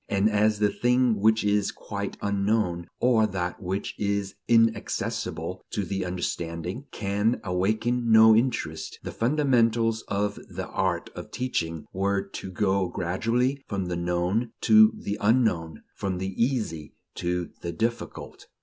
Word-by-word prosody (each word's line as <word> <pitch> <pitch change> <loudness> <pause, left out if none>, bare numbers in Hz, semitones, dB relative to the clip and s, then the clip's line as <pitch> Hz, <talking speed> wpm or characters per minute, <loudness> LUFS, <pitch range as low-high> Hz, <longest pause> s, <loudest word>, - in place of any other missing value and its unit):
And 100 +2 +2
as 105 +1 +3
the 105 -1 +2
thing 125 -3 +2
which 110 +1 +3
is 105 -1 +2
quite 100 -1 -5
unknown, 100 -4 0
or 115 -3 +4
that 90 -1 -3
which 95 +2 -3
is 100 -1 -1
inaccessible 110 -6 0
to 100 - -2
the 95 +1 -2
understanding, 90 - -4
can 105 +3 0
awaken 110 +6 0
no 110 0 +8
interest, 80 -10 -1
the - - -5
fundamentals 115 -4 +2
of 100 +1 -1
the - - -5
art - - -1
of - - -8
teaching 85 -11 -3
were 100 +1 0
to 95 - -7
go 95 0 +1
gradually 115 +11 0
from 95 -3 -3
the 90 - -1
known 90 +7 -1
to 220 0 +7
the 100 - -4
unknown, 105 -8 +1
from 95 -2 -2
the 95 +1 -3
easy 110 - -2 0.2
to 90 -1 -2
the 85 - -3
difficult. 115 +8 -4
100 Hz, 140 wpm, -26 LUFS, 90-115 Hz, 0.2 s, no